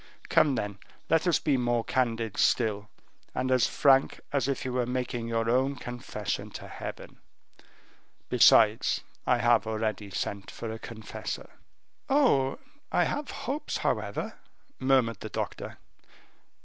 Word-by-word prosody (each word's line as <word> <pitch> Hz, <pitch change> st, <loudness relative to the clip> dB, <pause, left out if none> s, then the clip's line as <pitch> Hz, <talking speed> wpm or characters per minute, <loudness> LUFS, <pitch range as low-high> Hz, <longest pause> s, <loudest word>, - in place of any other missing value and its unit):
Come, 145 Hz, -4 st, +4 dB
then, 105 Hz, -3 st, -3 dB, 0.3 s
let 165 Hz, +2 st, +3 dB
us 175 Hz, -, +4 dB
be 145 Hz, -4 st, +1 dB
more 120 Hz, -2 st, +1 dB
candid 115 Hz, -4 st, -1 dB
still, 105 Hz, -3 st, +1 dB, 0.5 s
and 130 Hz, 0 st, 0 dB
as 125 Hz, -3 st, +4 dB
frank 135 Hz, -1 st, +3 dB
as 140 Hz, -3 st, +1 dB
if 135 Hz, -2 st, -2 dB
you 130 Hz, -, -2 dB
were 125 Hz, -1 st, 0 dB
making 125 Hz, -2 st, -2 dB
your 115 Hz, -1 st, 0 dB
own 130 Hz, +4 st, +2 dB
confession 120 Hz, -1 st, -5 dB
to -, -, -10 dB
Heaven. -, -, -8 dB, 1.1 s
Besides, -, -, +5 dB, 0.3 s
I 125 Hz, -, +4 dB
have 120 Hz, -2 st, +3 dB
already 110 Hz, -2 st, -2 dB
sent 100 Hz, +1 st, -4 dB
for 115 Hz, -, -6 dB
a 110 Hz, -, -6 dB
confessor." 110 Hz, -2 st, -7 dB, 0.6 s
"Oh! 245 Hz, -, +3 dB, 0.3 s
I -, -, +3 dB
have 290 Hz, -1 st, -2 dB, 0.2 s
hopes, 280 Hz, +5 st, -2 dB
however," -, -, -2 dB, 0.4 s
murmured 130 Hz, -3 st, +2 dB
the 110 Hz, -, -6 dB
doctor. -, -, -5 dB
120 Hz, 135 wpm, -28 LUFS, 115-135 Hz, 1.1 s, Besides